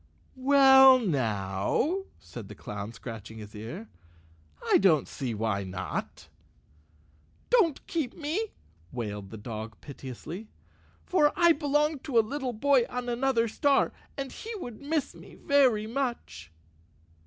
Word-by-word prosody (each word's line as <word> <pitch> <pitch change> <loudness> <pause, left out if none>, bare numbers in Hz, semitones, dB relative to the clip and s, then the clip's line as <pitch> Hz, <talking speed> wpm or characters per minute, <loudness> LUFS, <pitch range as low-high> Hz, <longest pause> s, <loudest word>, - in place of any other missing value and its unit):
"Well, 265 0 +7
now," 130 - -1
said - - -10
the - - -9
clown, 105 +1 -6
scratching 115 -1 -9
his 105 -1 -10
ear, 110 +1 -7 0.8
"I - - +5
don't 165 -7 +4
see 125 -4 -4
why 105 -2 -1
not." 90 -1 -5 1.2
"Don't 380 - +3
keep 320 -9 -3
me," 330 +9 -2 0.4
wailed 105 -5 -5
the 110 - -8
dog 110 0 -7
piteously, 145 - -8 0.6
"for 300 -5 +3
I 345 -1 +5
belong 295 -1 +1
to 255 -2 -2
a - - +8
little 265 +1 -3
boy 260 +2 +3
on 245 0 -4
another 240 -1 +1
star, 280 +5 +2 0.3
and 275 -1 -4
he 450 - -8
would 245 - -8
miss 295 +1 -1
me - - -14
very 260 -8 +3
much." 230 - -4
235 Hz, 130 wpm, -28 LUFS, -, 1.2 s, a